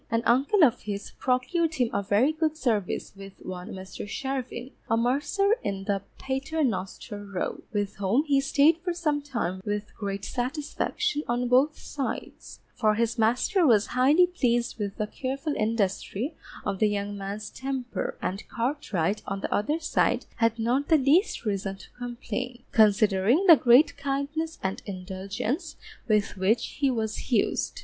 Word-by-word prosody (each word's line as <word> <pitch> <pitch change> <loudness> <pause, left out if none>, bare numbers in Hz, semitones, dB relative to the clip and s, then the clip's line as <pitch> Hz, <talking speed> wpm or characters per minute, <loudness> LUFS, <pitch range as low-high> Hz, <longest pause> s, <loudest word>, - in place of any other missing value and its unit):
An 230 0 +1
uncle 275 - +4
of 245 -4 +4
his 205 -1 -5
procured 290 +6 +1
him 245 -5 +1
a - - +1
very 205 +8 +3
good 315 0 -1
service 220 - -1
with 195 0 -10
one 180 -1 -6
Mr. 190 +2 -7
Charvin, 260 +1 -4 0.2
a 225 - +3
mercer 290 - +2
in 195 -1 -3 0.3
Paternoster 265 -7 -2
Row, 200 -2 -4
with 205 -2 -2
whom 200 +8 +2
he 280 -3 +2
Stayed 295 +4 +4
for 355 -2 -1
some 300 -4 0
time 230 -10 -3
with 210 0 -4
great 200 -1 -4
satisfaction 290 - -2
on 245 +1 0
both 265 +5 +3
sides; 275 -3 -6
for 215 -1 +2
his 235 +1 0
master 250 - +2
was 225 -8 +5
highly 280 +8 +5
pleased 240 -10 0
with 200 -1 -3
the 215 - 0
careful 270 +7 -3
industry 215 - -1 0.3
of 195 - -2
the 215 - +4
young 205 0 -2
man's 200 +2 -5
temper, 265 -2 -4
and 195 +3 -3
Cartwright 230 - -1
on 195 0 -3
the - - -2
other 295 +10 0
side 320 - +1
had 230 -1 +2
not 245 +5 +1
the 320 - +5
least 290 - +2
reason 195 -2 -2
to 195 - -15
complain, 245 0 -5
considering 215 - +4
the 340 -4 +10
great 255 +2 +5
kindness 285 +4 -2
and 190 0 -2
indulgence 200 - -4 0.3
with 210 -3 +1
which 195 +5 0
he 280 -2 +3
was 220 -1 -3
used. 375 - +1
240 Hz, 155 wpm, -27 LUFS, 205-285 Hz, 0.3 s, the